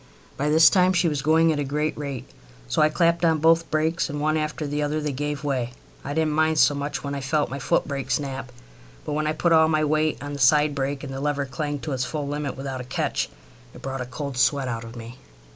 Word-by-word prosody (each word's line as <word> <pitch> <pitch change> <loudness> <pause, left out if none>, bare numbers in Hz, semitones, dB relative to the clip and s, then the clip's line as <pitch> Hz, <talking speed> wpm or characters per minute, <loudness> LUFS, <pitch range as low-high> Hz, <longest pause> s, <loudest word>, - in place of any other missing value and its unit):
By 145 +2 -1
this 160 +2 +7
time 185 -1 +4
she 175 -1 +2
was 150 -3 -1
going 160 +2 +4
at 145 - -3
a - - 0
great 150 +3 -1
rate, 140 -3 -5 0.4
so - - +1
I 155 - +5
clapped 170 +1 +2
on 165 -1 +4
both 165 +2 +3
brakes, 160 +2 0
and 145 0 -4
one 155 +1 +1
after 155 0 -2
the 145 +1 -2
other 150 +1 0
they 150 -1 -2
gave 145 +2 -3
way. 130 -4 -1 0.3
I 145 +1 -4
didn't 160 -1 +1
mind 160 0 +2
so 150 - +5
much 145 +1 -4
when 140 0 -3
I 140 - -3
felt 145 +2 0
my 140 - -4
footbrake 135 0 -1
snap, 135 -1 -2 0.5
but - - -3
when 155 +1 0
I 155 - +1
put 170 +2 +2
all 160 0 +6
my 155 -1 +2
weight 155 +1 +1
on 145 - -5
my 145 - -5
side 150 +2 +4
brake, 140 0 -2
and 135 -2 -6
the 135 - -5
lever 145 -1 0
clanged 145 +2 -4
to 155 - -4
its 130 -1 -1
full 145 +2 -3
limit 145 -1 -3
without 135 -1 -4
a - - -6
catch, 125 - -2 0.5
it - - -12
brought 135 -1 -4
a 125 - -5
cold 135 +1 -5
sweat 135 0 +2
out 115 -2 -3
of 115 +1 -10
me. 120 +1 -9
145 Hz, 250 wpm, -24 LUFS, 135-155 Hz, 0.5 s, this